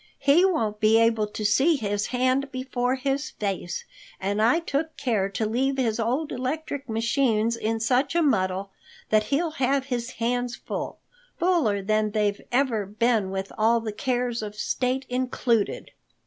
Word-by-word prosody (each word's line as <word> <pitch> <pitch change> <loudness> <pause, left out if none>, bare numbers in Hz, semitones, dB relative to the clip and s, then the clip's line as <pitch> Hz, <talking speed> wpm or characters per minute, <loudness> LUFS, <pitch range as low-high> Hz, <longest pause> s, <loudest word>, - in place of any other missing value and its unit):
"He 285 +6 +4
won't 225 - +1
be 215 +1 +5
able 225 -2 +3
to 210 0 -5
see 270 +10 +4
his 205 -5 -1
hand 255 +2 +1
before 255 -1 -1
his 275 +3 -1
face, 195 -7 -4 0.3
and 200 +2 -1
I 235 +9 +4
took 315 -1 -3
care 210 -6 0
to 205 +3 -2
leave 265 +5 0
his 235 -4 0
old 255 +7 -1
electric 275 +1 -4
machines 230 0 +1
in 225 0 -1
such 250 +7 +1
a 340 - +4
muddle 190 -7 0 0.4
that 215 0 +4
he'll 310 +7 0
have 270 +1 +2
his 245 -2 -3
hands 245 +1 -1
full—fuller 350 - -2
than 215 +1 +1
they've 205 -1 0
ever 240 -6 +1
been 215 -1 +1
with 195 0 -4
all 230 +2 +4
the 220 -2 -5
cares 245 -1 -1
of 210 -1 -6
state 255 +4 -1
included." 250 -3 -1
240 Hz, 155 wpm, -25 LUFS, 215-270 Hz, 0.4 s, be